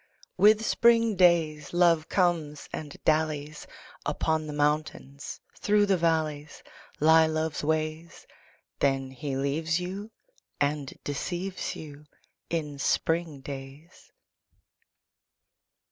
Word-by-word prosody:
With 215 +3 +5
spring 230 -2 +4
days 165 -5 +3
Love 170 -2 +3
comes 165 -6 0
and 150 -2 -6
dallies: 155 -1 0 0.4
Upon 160 -1 -1
the - - -5
mountains, 145 -1 -2 0.2
through 205 0 +3
the 200 -1 +3
valleys 155 -3 -1 0.4
Lie 160 +1 +6
Love's 155 -1 -2
ways. 155 +2 -2 0.5
Then 135 -1 +1
he 135 +1 -4
leaves 160 +5 0
you 190 +4 -5 0.5
and 145 -1 0
deceives 180 +6 -3
you 150 -1 -10 0.4
In 150 -4 -3
spring 160 0 0
days. 140 +5 -10
155 Hz, 100 wpm, -27 LUFS, 145-170 Hz, 0.5 s, Lie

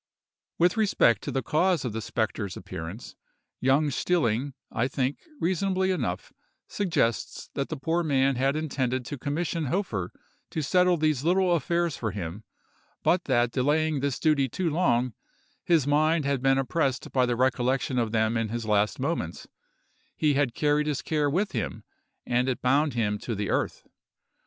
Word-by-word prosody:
With 175 +4 +3
respect 195 - +3
to - - -4
the 135 - -1
cause 165 -1 +1
of 120 - -3
the 110 - -3
spectre's 110 -3 -2
appearance, 80 +8 -7 0.4
Jung 140 +3 +2
Stilling, 135 -4 0 0.2
I 120 +2 0
think, 135 +1 -1 0.2
reasonably 190 +2 +1
enough, 115 - -3 0.3
suggests 165 - -1
that 140 - -2
the 160 - -4
poor 165 +6 0
man 135 -4 +2
had 135 +3 +1
intended 130 -5 -1
to 145 - -5
commission 155 +3 -2
Hofer 125 - -2 0.4
to 160 - -3
settle 180 +3 +3
these 155 -4 +1
little 180 +2 +3
affairs 170 +1 0
for 110 - -2
him, 95 0 -6 0.6
but 180 +1 +2
that 120 -3 +2
delaying 150 +3 +1
this 140 -1 -1
duty 145 -4 +2
too 170 +6 -1
long, 130 -8 +1 0.5
his 165 -6 +3
mind 155 +2 +2
had 140 -2 0
been 135 0 +3
oppressed 135 -1 -1
by 125 -2 +2
the 120 - 0
recollection 130 +1 +1
of 115 -2 0
them 110 +1 +1
in 115 -1 -1
his 115 +1 -3
last 105 +1 +1
moments—he 145 - -4
had 140 -4 +1
carried 150 0 +2
his 150 -2 -2
care 150 -2 +1
with 190 +8 0
him, 115 -5 -3 0.4
and 125 +2 +1
it 130 - -1
bound 140 +2 +2
him 105 -3 0
to 115 - -4
the 100 -1 -2
earth. - - -1
135 Hz, 160 wpm, -27 LUFS, 120-160 Hz, 0.6 s, With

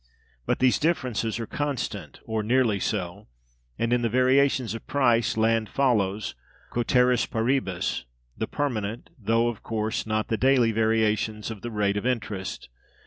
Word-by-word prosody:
But - - +2
these 130 -1 +3
differences 125 -8 0
are 115 - -3
constant, 115 - -4
or 110 -1 -1
nearly 115 -2 +2
so; 100 0 -3 0.5
and, 115 +1 0
in 125 - +2
the 115 - +1
variations 130 -1 +3
of 115 - -8
price, 120 -5 +2
land 110 0 +2
follows, 105 -7 +1 0.4
cæteris 125 0 +2
paribus, 115 - -1 0.3
the 110 - -3
permanent 115 -6 -3
(though, 115 +2 +2
of 120 -2 -4
course, 110 0 -2
not 110 0 0
the 110 - +1
daily) 125 -1 +4
variations 110 -1 +1
of 105 -3 -8
the 120 - -4
rate 105 -2 0
of 105 - -1
interest. 105 - -3
115 Hz, 145 wpm, -26 LUFS, 105-125 Hz, 0.5 s, daily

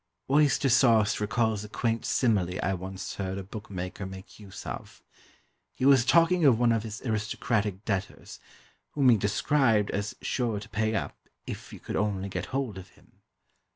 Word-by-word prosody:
"Oyster 145 -1 +4
sauce" 115 -4 +4
recalls 110 -1 0
a 105 - -9
quaint 115 0 -1
simile 95 -8 +1
I 95 - +1
once 95 0 -6
heard 95 -1 -3
a 100 - -5
bookmaker 95 -2 -6
make 95 +2 -11
use 100 -3 -10
of. - - -8 0.7
He 130 - -1
was 135 -3 +6
talking 170 +4 +4
of 130 -6 +6
one 120 -1 +4
of 115 -1 +1
his 110 -1 -7
aristocratic 110 -3 -1
debtors, 100 -3 -4 0.5
whom 140 -3 +4
he 115 - +6
described 105 +1 +2
as 100 +1 -3
sure 115 -5 -1
to 110 +2 -11
pay 110 0 0
up, 100 - -3 0.3
if - - -7
you - - -10
could - - -4
only 100 -2 -1
get - - -4
hold 130 -7 -3
of 95 - -12
him. - - -26
110 Hz, 170 wpm, -28 LUFS, 100-120 Hz, 0.7 s, was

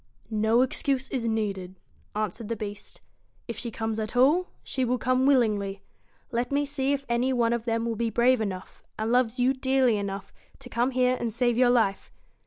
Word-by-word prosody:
' - - -32 0.2
No 235 +3 +5
excuse 265 0 -1
is 240 -3 -1
needed,' 195 -5 -2 0.4
answered 215 +1 -3
the 230 - -2
Beast 205 -1 -8 0.2
' - - -39
If 235 - -4
she 235 - -5
comes 220 0 -3
at 215 +2 -4
all, 305 +9 +4 0.2
she 260 - -2
will 250 0 +1
come 255 +2 +2
willingly. 210 -7 +2 0.5
Let 240 +1 -1
me 285 +1 +1
see 275 -1 -1
if 280 -1 -1
any 240 +2 +1
one 235 -2 +2
of 235 -1 -2
them 230 0 0
be 230 +1 -1
brave 245 +1 +3
enough, 190 -3 -5 0.2
and 220 +1 -1
loves 250 0 +2
you 255 +2 +3
dearly 260 -3 +2
enough, 200 -1 -5 0.2
to 260 -2 -12
come 240 +1 +1
here 255 -1 +2
and 235 - -2
save 240 +1 +1
your 250 +1 +4
life. 225 -5 +1
235 Hz, 195 wpm, -27 LUFS, 220-255 Hz, 0.5 s, No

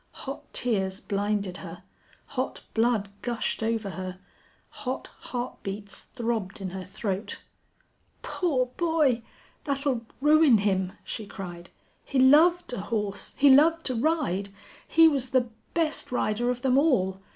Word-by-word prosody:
Hot 270 +1 -7
tears 195 -6 0
blinded 200 -2 -1
her, - - -9 0.4
hot 255 -1 -3
blood 225 -3 +2
gushed 240 -2 -2
over 220 -3 -1
her, 185 -1 -6 0.5
hot 260 0 -5
heart 245 0 -5
beats 200 +1 -6
throbbed 225 -6 -2
in 190 -2 -4
her 190 0 -5
throat. 195 +2 -4 0.8
"Poor 290 -9 0
boy! 315 -8 +2 0.4
That'll 275 -4 0 0.2
ruin 300 -3 +6
him," 190 -2 0
she 215 - -5
cried. 175 -4 -8 0.3
"He 275 - -3
loved 310 +6 +5
a 210 - -3
horse. 205 -1 -3
He 280 0 +7
loved 325 +4 +5
to 255 - -1
ride. 230 - 0 0.4
He 325 0 +7
was 275 -5 +1
the 250 -2 +2 0.3
best 320 -5 0
rider 240 0 0
of 250 +1 -2
them 265 0 +4
all. 190 - +2
240 Hz, 135 wpm, -27 LUFS, 200-275 Hz, 0.8 s, He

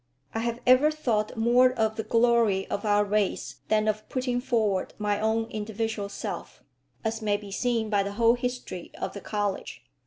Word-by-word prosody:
I 225 - -1
have 235 +1 -2
ever 255 +4 +6
thought 235 -8 -1
more 245 +3 +5
of 220 -2 0
the 220 - -2
glory 230 -4 +3
of 205 - -2
our 205 0 +3
race 205 -1 -1
than 215 0 +2
of 215 0 -1
putting 250 -1 -1
forward 215 -7 0
my 205 -1 0
own 220 +1 +1
individual 215 -1 -3
self, - - -6 0.4
as 220 0 -2
may 205 -1 +1
be 205 -1 -10
seen 230 +1 0
by 205 -1 +3
the 200 0 -3
whole 230 +2 +4
history 245 -7 -4
of - - -3
the 200 - -7
college. 205 -1 -3
220 Hz, 180 wpm, -27 LUFS, 205-235 Hz, 0.4 s, ever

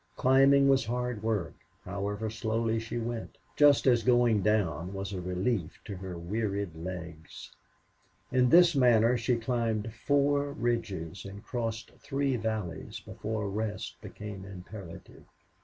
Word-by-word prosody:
Climbing 135 +2 +5
was 135 -1 +4
hard 125 -1 -2
work, 110 -6 -1 0.3
however 100 +3 -3
slowly 115 0 0
she 115 +1 -5
went, 115 0 -4 0.2
just 145 -1 +5
as 120 -3 +5
going 120 -3 +4
down 95 -4 0
was 95 0 -4
a 95 - -3
relief 90 0 -2
to 100 - -5
her 90 -1 -6
wearied 100 +1 -2
legs. 85 -2 -8 0.8
In 125 -1 +4
this 175 +3 +7
manner 120 -2 +5
she 120 +1 +1
climbed 115 -2 -1
four 145 +3 +1
ridges 100 - -2
and 100 +1 -9
crossed 115 -2 -4
three 140 -2 -1
valleys 110 -6 -4
before 110 0 -4
a - - -2
rest 105 +1 -4
became 105 -2 -8
imperative. 95 -1 -10
110 Hz, 135 wpm, -30 LUFS, 100-120 Hz, 0.8 s, this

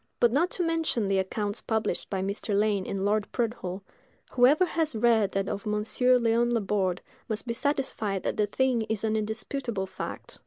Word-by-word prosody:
But 240 - +4
not 315 +8 +2
to 360 - +1
mention 325 -10 0
the 195 -1 +2
accounts 205 +2 -2
published 220 -1 -2
by 190 -1 -1
Mr. 200 +1 -1
Lane 205 -2 +1
and 195 0 -2
Lord 205 0 0
Prudhoe, 225 -6 -3 0.5
whoever 270 +8 +5
has 325 -6 -1
read 220 -2 +3
that 195 0 0
of 205 0 -4
Monsieur 225 +4 +2
Léon 235 0 +2
Laborde 195 -5 0 0.3
must 220 +1 -2
be 235 - -2
satisfied 235 -7 -1
that - - -1
the 210 - +1
thing 255 +2 +1
is 220 -2 -1
an 220 0 +1
indisputable 220 0 -3
fact. 190 - -7
220 Hz, 180 wpm, -28 LUFS, 200-245 Hz, 0.5 s, whoever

